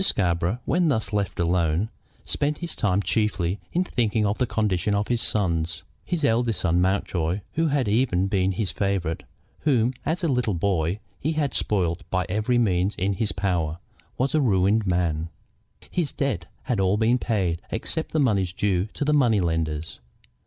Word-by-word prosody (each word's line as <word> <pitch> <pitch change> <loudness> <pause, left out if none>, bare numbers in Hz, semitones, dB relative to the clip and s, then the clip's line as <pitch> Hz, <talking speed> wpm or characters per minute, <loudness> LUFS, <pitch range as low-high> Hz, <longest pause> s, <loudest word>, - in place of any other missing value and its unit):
Scarborough, 90 - +1
when 175 -1 +2
thus 110 -5 -1
left 100 -4 -1
alone, 85 +3 +1 0.4
spent 145 +1 -1
his 170 -2 -5
time 100 -1 +1
chiefly 100 -4 0
in 180 - +2
thinking 115 - 0
of 100 +1 0
the 125 - +2
condition 105 -2 0
of 100 +1 -1
his 120 -1 +1
sons. 85 -5 0 0.2
His 170 -5 -1
eldest 115 -4 +1
son, 85 0 +2
Mountjoy, 95 -1 0
who 165 +1 +1
had 140 -5 +1
ever 110 0 +2
been 95 +1 +1
his 95 +1 -2
favorite, 95 -5 -1 0.4
whom 125 -4 +2
as 170 +3 -1
a - - +3
little 125 - +1
boy 90 0 0 0.2
he 155 +3 -1
had 150 -4 0
spoiled 90 -4 0
by 90 -1 0
every 110 +5 +1
means 95 -4 +2
in 100 +1 0
his 105 +2 0
power, 85 -5 -1 0.4
was 130 +2 0
a 155 - +3
ruined 100 -2 +2
man. 85 -3 0 0.6
His 170 -6 -1
debts 130 - -2 0.2
had 125 -6 -1
all 95 +1 +3
been 115 +3 +3
paid, 95 -9 0
except 160 +7 -3
the 160 - +1
money 105 -9 +3
due 95 -3 +1
to 145 - -1
the 150 - +2
money 120 -8 +4
lenders. 80 -2 -2
100 Hz, 175 wpm, -25 LUFS, 90-120 Hz, 0.6 s, money